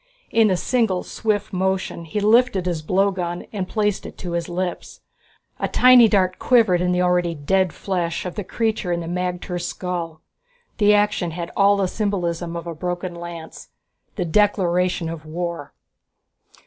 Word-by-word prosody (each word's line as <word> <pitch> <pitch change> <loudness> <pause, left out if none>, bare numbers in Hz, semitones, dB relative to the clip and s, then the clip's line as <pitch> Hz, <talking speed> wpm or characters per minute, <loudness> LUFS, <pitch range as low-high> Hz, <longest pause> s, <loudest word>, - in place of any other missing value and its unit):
In 225 -1 +4
a 185 - +2
single 220 -5 0
swift 210 -2 -2
motion 190 -2 -1
he 165 +6 -3
lifted 215 -2 +3
his 175 -3 -1
blowgun 185 0 0
and 190 -3 -3
placed 210 -1 0
it - - -10
to 180 - -6
his 170 0 -2
lips. 175 0 -4 0.6
A - - 0
tiny 250 -2 +7
dart 185 -3 +1
quivered 220 -8 +4
in 180 0 +1
the 180 0 +2
already 175 -1 +1
dead 185 +5 +1
flesh 175 -3 -3
of 180 - -4
the 210 - -4
creature 220 -2 -1
in 170 0 -1
the - - -6
magter's 180 0 -3
skull. 170 -3 -4 0.6
The 210 0 +5
action 205 -4 +1
had 170 +1 -6
all 200 0 +4
the 195 -2 +1
symbolism 175 -5 -2
of 170 - -5
a 170 - -5
broken 175 +2 -4
lance, 170 -1 -9 0.5
the 180 - -2
declaration 180 -2 +1
of 165 -2 -6
war. 165 -1 -5
180 Hz, 160 wpm, -22 LUFS, 170-205 Hz, 0.6 s, tiny